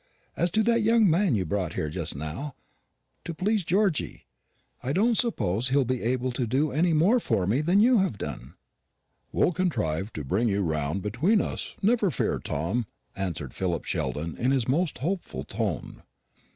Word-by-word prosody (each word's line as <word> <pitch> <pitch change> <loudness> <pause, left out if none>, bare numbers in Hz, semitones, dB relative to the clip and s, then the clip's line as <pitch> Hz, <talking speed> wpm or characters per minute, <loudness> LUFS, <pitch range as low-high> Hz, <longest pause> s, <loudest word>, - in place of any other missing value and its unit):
As 175 - +1
to 220 - +3
that 230 +1 +3
young 225 0 +4
man 175 - +3
you 95 -3 0
brought 95 0 -2
here 75 - -2
just 80 -2 -4
now, 80 - -5 0.7
to 170 - -5
please 205 +3 +1
Georgy, 190 -1 0 0.6
I 130 +3 -2
don't 225 +6 +3
suppose 120 - 0
he'll 135 0 +3
be 130 0 -1
able 125 +2 0
to 125 -1 -2
do 140 +6 +1
any 165 +5 +2
more 175 +11 +4
for 95 - 0
me 115 +10 +1
than 175 +6 +3
you 240 0 +5
have 190 - 0
done." 75 -7 -6 0.8
"We'll - - +2
contrive 110 - -1
to 75 - -5
bring 100 - +1
you 100 0 +1
round 80 +2 -1
between 145 - +2
us, - - -4
never 220 -1 +3
fear, 135 - -1
Tom," 100 +10 -2 0.3
answered 85 -9 -4
Philip 85 -3 -2
Sheldon 80 +3 -2
in 125 - +1
his 135 -4 +1
most 155 +5 +1
hopeful 150 - -3
tone. - - -4
130 Hz, 175 wpm, -27 LUFS, -, 0.8 s, you